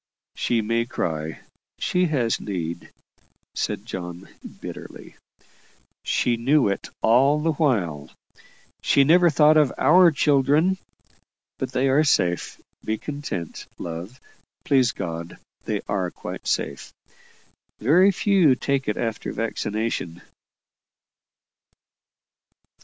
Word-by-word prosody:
"She 115 -2 0
may 115 +2 0
cry; 80 -8 -3 0.4
she 180 0 +1
has 125 -7 0
need," 85 -4 -5 0.6
said - - -3
John, 90 0 -7 0.3
bitterly. - - -10 0.9
"She 120 -1 +1
knew 135 +2 +3
it 100 - -4
all 135 +6 +4
the 160 +2 +1
while. 100 - -1 0.7
She 140 - +4
never 175 +4 +5
thought 150 0 +5
of 150 -3 +4
our 180 +2 +6
children; 150 +5 +2 0.8
but - - -4
they 130 +2 +1
are 140 +3 +4
safe. 90 - 0 0.2
Be 110 - -2
content, 140 - -6
love 85 +9 -7 0.5
please 130 -5 +3
God, 85 0 -6 0.3
they - - -2
are 95 -3 -1
quite - - -8
safe. 70 - -2 0.9
Very 175 - +4
few 185 -7 +3
take 140 0 -1
it 105 - -1
after 115 -2 -3
vaccination." 110 -5 -3
125 Hz, 105 wpm, -23 LUFS, 95-150 Hz, 0.9 s, our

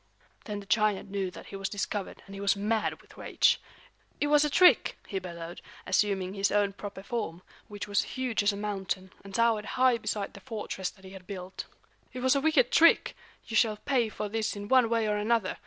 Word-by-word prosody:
Then 205 -1 -4
the - - -13
giant 210 -2 +1
knew 195 -2 -1
that - - -11
he - - -9
was 195 0 -3
discovered, 205 -1 -4
and 195 - -12
he 195 - -7
was 200 0 +3
mad 215 +2 -1
with - - -19
rage. - - +2 0.6
"It - - +1
was 295 0 +6
a 300 - +1
trick!" 360 +5 +5
he 195 - -3
bellowed, 170 -2 -8 0.2
assuming 190 -1 +1
his 200 0 +1
own 205 -1 +2
proper 200 -1 -8
form, 200 -7 -4 0.2
which 205 0 -6
was 205 -1 +2 0.2
huge 255 -4 0
as 205 +1 +3
a 200 - -6
mountain, 195 -2 -3
and 195 -1 -9
towered 230 -2 +2
high 255 -2 +4
beside 205 -3 -3
the - - -11
fortress 210 -4 -4
that 190 -1 -18
he 190 - -10
had 190 -2 -12
built. 185 -1 -6 0.5
"It 255 - -5
was 260 +2 +3
a 275 - +2
wicked 285 -5 +3
trick. 335 +1 +5 0.3
You 225 - -5
shall 220 -2 +3
pay 240 0 +1
for 210 - -4
this 220 +1 -2
in 205 0 -7
one 255 -3 +5
way 230 -1 +1
or 210 0 +1
another. 210 -2 0
205 Hz, 215 wpm, -29 LUFS, 195-230 Hz, 0.6 s, was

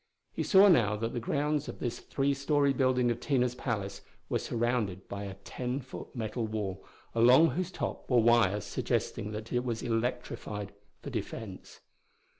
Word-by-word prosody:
He - - -2
saw 195 +1 +7
now 115 - +4
that 115 +2 -3
the 120 - -1
grounds 150 +4 0
of - - -7
this 120 -2 -3
three 140 0 0
story 140 0 +2
building 125 -2 +2
of 120 - -3
Tina's 125 -4 +1
palace 100 -6 -3 0.3
were - - +1
surrounded 115 -5 -1
by 100 0 -5
a 100 -1 -6
ten 125 +5 -4
foot 130 0 -9
metal 110 0 -2
wall, 105 -3 -4 0.3
along 125 +8 +6
whose 175 +6 -2
top - - -5
were 125 - +4
wires 115 -4 +4
suggesting 105 - -2
that 110 +3 -6
it 120 0 +1
was 115 -3 -3
electrified 115 -3 -3 0.3
for - - -6
defense. 100 -5 -6
120 Hz, 165 wpm, -30 LUFS, 105-130 Hz, 0.3 s, saw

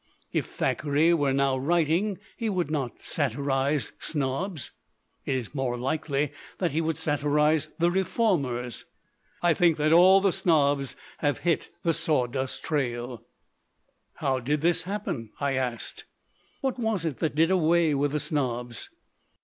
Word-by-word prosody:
If - - -1
Thackeray 150 +3 +1
were 145 -5 +2
now 135 0 +2
writing, 170 +6 +1 0.2
he 225 - -2
would 180 -6 -1
not 135 -7 -2
satirize 140 +1 0
snobs. 145 - -2 0.5
It 135 - 0
is 125 -1 -4
more 130 -3 -1
likely 145 +2 -1 0.3
that 175 -3 0
he 160 +4 0
would 160 -2 -1
satirize 150 0 +1
the 170 0 +3
reformers. 160 - 0 0.6
I 175 -1 +5
think 170 -2 +3
that 155 +1 +3
all 185 +3 +8
the 195 -2 +2
snobs 145 -5 +2 0.2
have 145 -2 0
hit 170 -2 +1
the 165 - +2
sawdust 130 -4 -1
trail." 125 -5 -1
1 120 -3 -8 1.0
'How 135 -1 0
did 145 +4 -1
this 170 +1 +2
happen?" 185 - -4
I 140 -1 0
asked. 125 -3 -3 0.6
"What 265 -2 -1
was 220 -7 0
it 155 -5 -3
that 160 -3 -1
did 165 +3 +3
away 170 -3 +3
with 140 +1 0
the 150 - +1
snobs?" 125 -5 -2
150 Hz, 145 wpm, -27 LUFS, 135-170 Hz, 1.0 s, all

